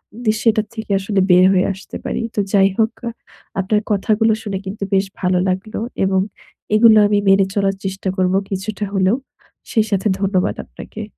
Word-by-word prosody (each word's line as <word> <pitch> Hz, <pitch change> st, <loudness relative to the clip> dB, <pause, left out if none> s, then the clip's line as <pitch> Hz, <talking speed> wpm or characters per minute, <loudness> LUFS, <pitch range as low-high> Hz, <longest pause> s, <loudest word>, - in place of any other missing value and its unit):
উদি 230 Hz, -2 st, 0 dB
সেটার 220 Hz, -2 st, +2 dB
থেকে 220 Hz, -2 st, -6 dB
আসলে 195 Hz, +1 st, -1 dB
বের 180 Hz, +1 st, +7 dB
হয়ে 185 Hz, -1 st, +3 dB
আসতে 195 Hz, -, -9 dB
পারি। -, -, -2 dB
তো -, -, 0 dB
যাই 195 Hz, -1 st, +5 dB
হোক 225 Hz, 0 st, +2 dB, 0.2 s
আ -, -, 0 dB, 0.5 s
আপনার 205 Hz, +2 st, +1 dB
কথাগুলো 215 Hz, +2 st, +2 dB
শুনে 200 Hz, -3 st, -3 dB
কিন্তু 200 Hz, +2 st, -5 dB
বেশ 195 Hz, 0 st, +3 dB
ভালো 180 Hz, -1 st, +1 dB
লাগলো। 190 Hz, +3 st, -2 dB, 0.2 s
এবং 190 Hz, 0 st, +2 dB, 0.6 s
এগুলো 220 Hz, 0 st, +7 dB
আমি 205 Hz, 0 st, +2 dB
মেনে 195 Hz, 0 st, +5 dB
চলার 195 Hz, -1 st, +1 dB
চেষ্টা 195 Hz, 0 st, -3 dB
করব 185 Hz, 0 st, +1 dB, 0.2 s
কিছুটা 205 Hz, +2 st, -3 dB
হলেও। 195 Hz, +2 st, +2 dB, 0.6 s
সেই 220 Hz, -2 st, +2 dB
সাথে 200 Hz, +1 st, +1 dB
ধন্যবাদ 195 Hz, -2 st, 0 dB
আপনাকে। 220 Hz, -, -9 dB
195 Hz, 170 wpm, -19 LUFS, 190-215 Hz, 0.6 s, বের